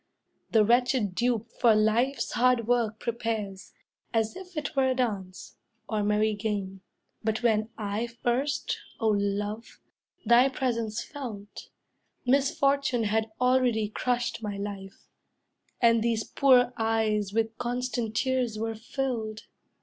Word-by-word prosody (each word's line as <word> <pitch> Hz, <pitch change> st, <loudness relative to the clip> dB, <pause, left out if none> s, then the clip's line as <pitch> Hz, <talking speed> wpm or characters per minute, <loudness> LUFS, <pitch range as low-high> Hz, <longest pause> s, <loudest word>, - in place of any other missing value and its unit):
The 220 Hz, -2 st, +4 dB
wretched 240 Hz, -3 st, +2 dB
dupe 230 Hz, +2 st, 0 dB
for 230 Hz, -3 st, +5 dB
life's 225 Hz, +6 st, +1 dB
hard 245 Hz, -2 st, +2 dB
work 230 Hz, -3 st, +1 dB
prepares, 220 Hz, -5 st, -3 dB, 0.4 s
As 225 Hz, +4 st, +1 dB
if 365 Hz, -2 st, -10 dB
it 295 Hz, -1 st, -3 dB
were 270 Hz, -1 st, +3 dB
a 260 Hz, -, +1 dB
dance, 200 Hz, -7 st, -3 dB, 0.3 s
or 215 Hz, -2 st, -1 dB
merry 210 Hz, +1 st, +2 dB
game. 200 Hz, -3 st, -3 dB, 0.4 s
But 220 Hz, +2 st, -1 dB
when 220 Hz, -2 st, +2 dB
I 210 Hz, +2 st, -2 dB
first, 240 Hz, +4 st, -1 dB, 0.2 s
O 225 Hz, -, +2 dB
love, 205 Hz, +2 st, -2 dB, 0.5 s
thy 245 Hz, +3 st, +6 dB
presence 230 Hz, -5 st, -2 dB
felt, 215 Hz, -8 st, -8 dB, 0.6 s
Misfortune 275 Hz, -1 st, +2 dB
had 220 Hz, +1 st, 0 dB
already 250 Hz, -4 st, +2 dB
crushed 245 Hz, +2 st, -1 dB
my 205 Hz, -2 st, -4 dB
life, 200 Hz, -1 st, -7 dB, 0.7 s
And 230 Hz, -1 st, +4 dB
these 225 Hz, -1 st, 0 dB
poor 250 Hz, -1 st, +4 dB
eyes 220 Hz, -3 st, +1 dB
with 225 Hz, +1 st, 0 dB
constant 245 Hz, -2 st, -2 dB
tears 255 Hz, -4 st, 0 dB
were 225 Hz, +1 st, -2 dB
filled. 225 Hz, -1 st, -4 dB
225 Hz, 125 wpm, -28 LUFS, 215-250 Hz, 0.7 s, thy